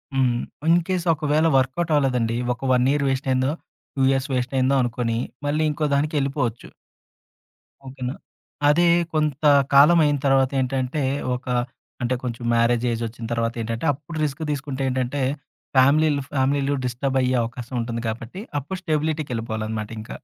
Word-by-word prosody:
హ్మ్. 125 -3 +2 0.3
ఇన్‌కేస్ 175 +2 +2
ఒకవేళ 155 +1 +1
వర్క్‌ఔట్ 135 +6 0
అవ్వలేదండి 125 -5 +1 0.2
ఒక 130 +2 -4
1 125 0 +3
ఇయర్ 145 0 +1
వేస్ట్‌ 135 0 -1
అయ్యిందో, 130 +1 +2 0.4
2 135 - -5
ఇయర్స్ 135 +1 0
వేస్ట్‌ 125 +1 -1
అయిందో 130 +2 +2
అనుకోని 120 -1 -1 0.3
మళ్ళీ 150 +2 +1
ఇంకోదానికెళ్ళిపోవచ్చు. 140 -4 -1 1.2
ఓకేనా! 130 0 -5 0.5
అదే 170 +4 +4 0.3
కొంత 155 -2 0 0.3
కాలం 150 +5 +7
అయిన 145 -1 +2
తరవాత 135 -1 +3
ఏంటంటే 130 +2 -1 0.3
ఒక 125 - -9 0.6
అంటే 120 +1 0
కొంచెం 120 -1 -4
మ్యారేజ్ 115 0 +2
ఏజ్ 115 0 -3
వచ్చిన 115 +1 -7
తరవాతేంటంటే 115 +2 -2
అప్పుడు 150 +4 -9
రిస్క్ 145 +1 -2
దీసుకుంటే 140 -2 -4
ఏంటంటే 130 +2 -1 0.5
ఫ్యామిలీలు, 145 +2 +4
ఫ్యామిలీలు 140 +1 +1
డిస్టర్బ్ 130 +2 -1
అయ్యే 130 0 +1
అవకాశముంటుంది 115 0 -4
కాబట్టి, 115 +9 -5 0.2
అప్పుడు 145 +7 -6
స్టెబిలిటీకెళిపోవాలన్నమాటింక. 115 - -3
130 Hz, 125 wpm, -23 LUFS, 120-145 Hz, 1.2 s, కాలం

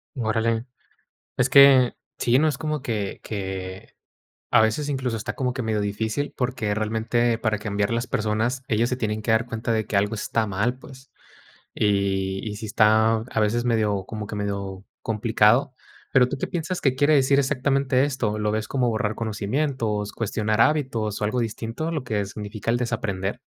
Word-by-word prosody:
Órale. 115 -1 0 0.7
Es 125 +1 +2
que, 135 -3 +7 0.2
sí, 125 +2 +3
no 155 - +3
es 145 -3 -2
como 155 -1 -2
que 110 -6 -3
que, 95 -2 -6 0.6
a 110 - +6
veces, 110 +7 +1
incluso, 130 -4 -1
está 110 - -4
como 125 -2 -1
que 130 - -4
medio 110 -2 0
difícil, 110 +7 -2
porque 120 -5 -1
realmente 115 +2 0
para 110 -2 0
cambiar 100 -1 -1
las 115 +1 -1
personas, 115 +4 -1
ellas 115 +2 +2
se 125 - -1
tienen 110 -3 -2
que 110 +1 0
dar 110 +1 +2
cuenta 115 +1 -3
de 110 -1 0
que 105 - -1
algo 105 +3 +1
está 110 +1 -1
mal, 105 +6 -1
pues. 135 -1 -14 0.6
Y 95 -2 0
y 105 - -5
si 110 - -6
está 110 +1 +4
a 115 0 -3
veces 110 +3 +1
medio 105 -5 +1
como 105 -1 -6
que 105 - -6
medio 100 -1 -4 0.2
complicado. 115 +4 +2 0.4
Pero, 125 -2 +5
¿tú - - -3
qué - - -3
piensas 175 0 -3
que 135 -2 +2
quiere 145 +3 +3
decir 140 0 +4
exactamente 135 -1 +1
esto? 125 -7 -1
¿Lo 105 0 0
ves 110 0 -2
como 130 -3 +1
borrar 110 -1 -1
conocimientos, 110 -1 -2
cuestionar 110 0 0
hábitos 125 -9 +1
o - - 0
algo 110 +4 -1
distinto 115 +6 -4
a 165 - -2
lo 155 -5 -2
que 105 -3 -1
significa 105 +2 -6
el 120 - +2
desaprender? 105 -5 -2
110 Hz, 180 wpm, -24 LUFS, 105-130 Hz, 0.7 s, que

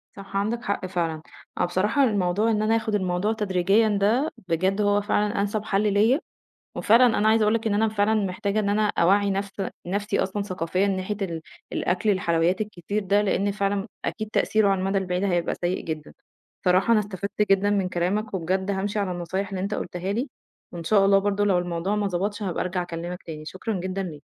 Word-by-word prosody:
صح 195 0 -6
عندك 225 +4 -1
حق 200 -3 -2
فعلًا، 165 -4 -2 0.4
أنا - - +2
بصراحة 205 +10 +1
الموضوع 205 -1 +2
إن 210 -1 +1
أنا 220 +1 +2
آخد 220 -1 0
الموضوع 185 +2 0
تدريجيًّا 205 +1 +2
ده 240 +10 +2 0.2
بجد 185 +4 +1
هو 205 0 +3
فعلًا 205 0 0
أنسب 205 +1 -1
حل 210 -1 +1
ليّا، 225 +8 +4 0.6
وفعلًا 235 +4 +5
أنا 210 +1 +3
عايزة 220 0 +4
أقول 215 +1 +3
لك 230 0 -1
إن 210 - +1
أنا 220 +2 +2
فعلًا 215 0 +1
محتاجة 200 0 0
إن 205 - -1
أنا 210 +1 +2
أوعّي 200 +3 +4
نفس 195 0 -2 0.3
نَفْسي 205 +3 -1
أصلًا 200 +2 -1
ثقافيًا 185 0 -1
ناحية 195 +1 -2
ال 170 -4 -3 0.3
الأكل 185 +4 0
الحلويات 175 -1 +1
الكتير 210 0 -3
ده، 200 +2 +2
لإن 200 0 +1
فعلًا 200 0 -1 0.2
أكيد 215 -1 -3
تأثيره 215 -2 +2
على 195 -1 +2
المدى 195 +1 +1
البعيد 180 0 -1
هيبقى 175 -3 0
سيء 175 +1 -2
جدًا. 155 -2 -5 0.5
بصراحة 185 +5 +3
أنا 220 - +5
استفدت 200 0 -3
جدًا 195 +1 +4
من 195 -3 +1
كلامك 190 +5 -1
وبجد 190 +2 -1
هامشي 200 +2 -1
على 200 -2 0
النصايح 180 +3 -3
اللي 190 -1 -4
أنت 200 +2 -2
قُلتها 180 +1 -3
لي، 245 +7 -2 0.4
وإن 170 -1 -7
شاء 200 +3 +4
الله 195 0 +5
برضه 205 +1 0
لو 195 -3 +3
الموضوع 175 +3 -1
ما 210 -1 0
ضبطش 200 +3 -2
هابقى 185 -4 -1
أرجع 180 0 -2
أكلّمك 175 +1 -6
تاني، 155 -2 -8
شكرًا 190 +7 -4
جدًا 185 +2 -3
ليك. 155 -6 -7
200 Hz, 195 wpm, -25 LUFS, 180-210 Hz, 0.6 s, وفعلًا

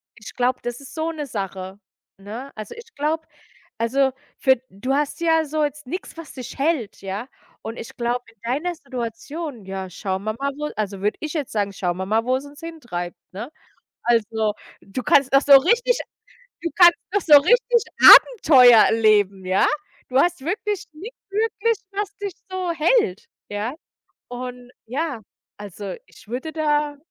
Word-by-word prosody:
ich 210 - -11
glaube, 250 +1 0
das 240 0 -4
ist 280 - -12
so 320 +1 -1
'ne 300 -3 -5
Sache, 195 -3 -6 0.4
ne? 225 +8 -8
Also, 215 -1 -7
ich 460 0 -14
glaube 315 +3 -2 0.5
also, 265 +4 +2 0.3
für 265 -2 +4
du 230 +8 -3
hast 295 +3 -1
ja 325 -1 +3
so 305 +1 -1
jetzt 295 -1 -3
nix, 340 +3 -6
was 330 -2 -9
dich 255 -3 -8
hält, 275 - -1
ja. 195 +5 -5 0.3
Und 225 +2 -7
ich - - -9
glaube, 245 +1 -1
in 225 - -44
deiner 280 +10 -2
Situation: 260 - -6
„Ja, 190 0 -5
schauen 190 0 -4
wir 215 +1 -2
mal, 280 0 0
wo“ 300 0 -3
Also, 200 -2 -3
würde 210 +1 0
ich 305 -1 -4
jetzt 295 -6 -3
sagen: 205 -2 -1
„Schauen 180 -2 -2
wir 190 - -3
mal, 220 +2 +1
wo's 260 +2 0
uns 285 +1 -13
hintreibt,“ 240 - -6 0.2
ne? 225 +9 -7 0.5
Also, 220 -2 +1 0.3
du 205 +6 -6
kannst 270 +1 +3
noch 275 - +7
so 280 -1 +8
richtig 475 - +2 0.6
du 335 - -2
kannst 350 -1 +8 0.2
noch 405 - +2
so 295 -4 +8
richtig 475 +5 +3 0.2
Abenteuer 265 - +8
erleben, 205 -4 +3
ja? 185 +1 +3 0.4
Du 255 - 0
hast 345 0 +2
wirklich 400 - -3
nichts 395 +11 -10
wirklich, 440 +1 0
was 405 0 -4
dich 400 -2 -5 0.2
so 370 -2 -2
hält, 320 - +1 0.2
ja? 210 +4 -3 0.6
Und 245 0 -7 0.2
ja, 275 0 -3 0.4
also, 205 -1 -7
ich - - -19
würde 255 +8 -5
da 295 -2 0
265 Hz, 170 wpm, -22 LUFS, 215-320 Hz, 0.6 s, so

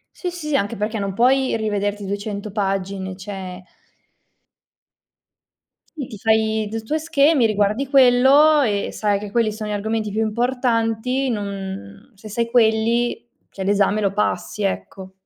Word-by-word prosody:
Sì, 360 - -4
sì, 310 -4 -4
anche 205 -3 0
perché 215 +1 -2
non 195 -1 -3
puoi 260 +2 +3
rivederti 205 -1 -2
200 205 +1 -4
pagine, 195 -1 -2
cioè 190 -2 -7 2.3
Sì, 285 -6 -5
ti 215 - -9
fai 220 0 +1
d 225 +1 -4
tuoi 310 +8 -1
schemi, 295 -4 +3
riguardi 215 +5 +1
quello 275 +3 +6
e 205 -5 0
sai 205 -2 0
che 210 0 -7
quelli 230 -1 +1
sono 215 0 -6
gli 210 - -2
argomenti 215 0 -2
più 220 +2 -1
importanti. 240 +2 0
Non 195 - -6
se 215 +2 -12
sai 230 +2 -2
quelli, 230 +1 +2 0.2
cioè, 195 - -6
l'esame 205 +1 +2
lo 200 -2 +1
passi, 210 0 -2
ecco. 190 -1 -4
215 Hz, 140 wpm, -21 LUFS, 200-240 Hz, 2.3 s, quello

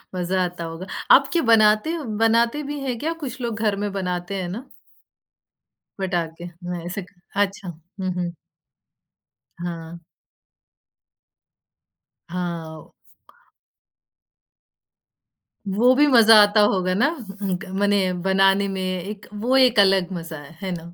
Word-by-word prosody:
मज़ा 185 +1 0
आता 175 -1 -5
होगा, 165 +3 -7 0.3
आप - - +7
क्या 335 - +2
बनाते 215 +6 +4
हो, 325 -3 -4 0.2
बनाते 235 +6 +2
भी 295 - -4
हैं 255 -3 -3
क्या 325 +2 -2
कुछ 255 -1 -6
लोग 230 -2 -3
घर 210 -3 +1
में 205 - -2
बनाते 185 0 -3
हैं 175 - -4
ना? 235 +9 -6 1.3
पटाखे, 175 -3 -3 0.2
न 175 -1 -4
ऐसे 185 +3 -4
क 180 - -21 0.2
अच्छा, 200 -1 -1
हुँ, 180 +3 -7
हुँ। 175 -1 -3 1.3
हाँ। 170 -1 -6 2.3
हाँ। 170 -3 -6 2.8
वो 240 +6 +4
भी 295 - +5
मज़ा 225 -4 +7
आता 205 +1 +3
होगा 185 -3 +2
ना, 215 +6 +3 0.3
उनग 185 -3 -2
मने 205 -1 +3 0.2
बनाने 195 +1 +3
में 190 -1 -4
एक 185 +2 -5
वो 235 +5 0
एक 250 -5 +5
अलग 195 -2 +4
मज़ा 165 -2 -6
है, 150 +4 -15
है 190 -2 -3
ना? 170 0 -7
195 Hz, 130 wpm, -22 LUFS, 175-215 Hz, 2.8 s, आप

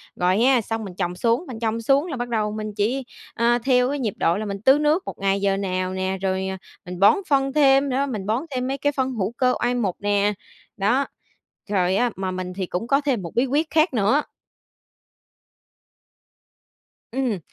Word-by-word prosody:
Rồi 180 +2 +2
ha, 250 0 +4
xong 225 +1 -4
mình 190 -4 -8
trồng 180 -1 -2
xuống 230 - +1
mình 235 -4 -7
trồng 225 0 -1
xuống 275 +7 +2
là 295 -7 -4
bắt 245 0 -4
đầu 215 -2 0
mình 215 0 -5
chỉ, 230 +6 0 0.3
ơ, 240 +1 +2
theo 250 -1 +3
cái 285 0 -2
nhịp 220 -6 -1
độ 170 +3 +2
là 215 - -3
mình 200 -1 -5
tưới 265 +5 +5
nước 305 +5 +2
1 - - -6
ngày 195 0 0
giờ 195 -1 +1
nào 185 -1 -2
nè, 190 0 -2
rồi, 190 0 -1
à, 190 0 -4 0.3
mình 180 0 -7
bón 200 - +6
phân 275 -1 +2
thêm 275 -1 +4
nữa, 270 +2 +1
mình 210 -6 -4
bón 225 +7 0
thêm 255 -1 -2
mấy 270 +1 -2
cái 290 +1 +1
phân 265 -2 -1
hữu 215 -4 -2
cơ 250 -1 +2
oai 245 +1 +1
mục 205 -7 -1
nè, 205 0 +1 0.4
đó. 240 +8 +2 0.6
Rồi 185 -2 +1
á, 245 +4 +2
mà 190 0 -3
mình 185 0 -5
thì 190 0 -3
cũng 180 +6 -4
có 275 +2 +3
thêm 270 -7 0
một 170 -3 -7
bí 245 - +3
quyết 295 +4 0
khác 315 0 +2
nữa 225 +6 +3 2.9
Ừm, 250 -7 -1
225 Hz, 210 wpm, -23 LUFS, 195-265 Hz, 2.9 s, bón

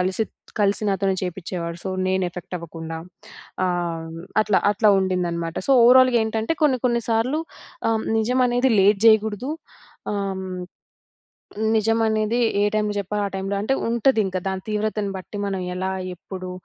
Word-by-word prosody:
కలిసి, 185 +4 0 0.4
కలిసి 200 +1 +2
నాతోనే 195 0 +1
చేపించేవాడు. 175 -2 -4
సో, 190 - -2 0.2
నేను 190 0 +1
ఎఫెక్ట్ 180 0 -6
అవ్వకుండా. 165 -1 -7 0.7
ఆహ్, 170 -2 -2 0.3
అట్లా, 210 -2 +2
అట్లా 210 +1 +4
ఉండిందన్నమాట. 175 -3 -1
సో, - - +6
ఓవరాల్‌గా 255 0 +6
ఏంటంటే, 220 +5 -1
కొన్ని 265 -4 +3
కొన్ని 235 -1 +1
సార్లు 250 +8 +1 0.5
ఆహ్, 220 -1 0 0.2
నిజమనేది 250 +2 +2
లేట్ 200 +1 +4
జేయకూడదు. 220 +4 +3 0.6
ఆహ్, 195 -2 -2 1.4
నిజమనేది 220 +1 +1 0.2
ఏ - - +3
టైములో 210 -1 0
జెప్పాలో 205 +1 -2
ఆ - - -6
టైములో 195 +1 -2
అంటే, 240 +6 +1
ఉంటదింక 225 -5 +2
దాని 190 -1 -3
తీవ్రతను 210 -1 -1
బట్టి 195 +2 -8
మనం 195 -1 -2
ఎలా, 190 +1 -2 0.2
ఎప్పుడు, 185 +1 -8
205 Hz, 135 wpm, -23 LUFS, 185-225 Hz, 1.4 s, సో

